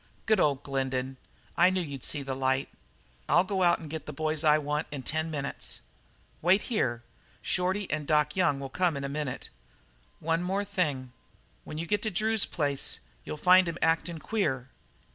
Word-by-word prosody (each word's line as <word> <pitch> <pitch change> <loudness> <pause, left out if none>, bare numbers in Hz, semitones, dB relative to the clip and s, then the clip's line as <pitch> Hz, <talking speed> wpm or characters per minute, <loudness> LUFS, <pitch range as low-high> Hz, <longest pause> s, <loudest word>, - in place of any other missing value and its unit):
"Good 215 -2 +4
ol' 145 -5 +4
Glendin. 135 -1 -2 0.4
I 180 - +6
knew 185 0 0
you'd 140 -7 -5
see 145 -2 -1
light. 130 0 0 0.6
I'll 170 +5 +6
go 190 0 -1
out 175 -1 +5
and 160 - -9
get 160 +1 -6
the - - -3
boys 155 +1 -1
I 150 -1 +6
want 150 +1 -1
in 140 -3 -6
ten 155 +4 -1
minutes. 140 -3 -4 0.6
Wait 185 +5 +4
here. 120 - 0 0.4
Shorty 185 +2 0
and 150 -1 -2
Doc 150 -1 +3
Young 160 -7 +2
will 135 -1 -5
come 175 -3 +1
in 140 - -4
a - - -1
minute. 140 -2 -4 0.7
One 165 +1 +1 0.3
thing 180 -9 0
more: 130 - -12 0.6
when 150 - -6
you 165 - -2
get 205 +3 +1
to 220 - -1
Drew's 215 +2 +1
place 145 -4 -1 0.3
you'll 155 - -5
find 180 +3 +6
him 170 - -4
actin' 165 +1 +1
queer." 150 - -1
155 Hz, 180 wpm, -29 LUFS, 140-180 Hz, 0.7 s, I